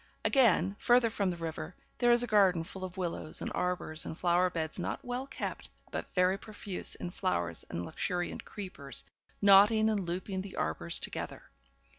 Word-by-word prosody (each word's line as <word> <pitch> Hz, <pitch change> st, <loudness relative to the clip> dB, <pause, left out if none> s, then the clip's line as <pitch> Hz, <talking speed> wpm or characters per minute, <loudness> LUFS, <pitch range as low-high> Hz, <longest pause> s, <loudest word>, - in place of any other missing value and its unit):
Again, 205 Hz, -, +3 dB
further 240 Hz, -2 st, +4 dB
from 200 Hz, -3 st, 0 dB
the 175 Hz, -, -2 dB
river, 165 Hz, 0 st, -6 dB, 0.2 s
there 240 Hz, -1 st, +4 dB
is 240 Hz, 0 st, +6 dB
a -, -, +1 dB
garden 195 Hz, -7 st, +3 dB
full 185 Hz, +3 st, -9 dB
of 185 Hz, 0 st, -6 dB
willows, 170 Hz, -3 st, -3 dB
and -, -, -4 dB
arbours, 180 Hz, -3 st, -1 dB
and 160 Hz, -, -6 dB
flower 180 Hz, +1 st, +2 dB
beds 160 Hz, 0 st, -1 dB
not -, -, -4 dB
well 245 Hz, +2 st, -3 dB
kept, -, -, -5 dB, 0.2 s
but -, -, -5 dB
very 185 Hz, +1 st, +3 dB
profuse 205 Hz, -3 st, 0 dB
in 175 Hz, -, -6 dB
flowers 85 Hz, -, -2 dB
and 85 Hz, +1 st, -4 dB
luxuriant 175 Hz, -, -2 dB
creepers, 170 Hz, -, -3 dB, 0.4 s
knotting 210 Hz, +2 st, +6 dB
and 210 Hz, -, 0 dB
looping 185 Hz, +1 st, -3 dB
the 195 Hz, 0 st, -8 dB
arbours 80 Hz, +2 st, +1 dB
together. -, -, -3 dB
185 Hz, 170 wpm, -31 LUFS, 170-205 Hz, 0.4 s, is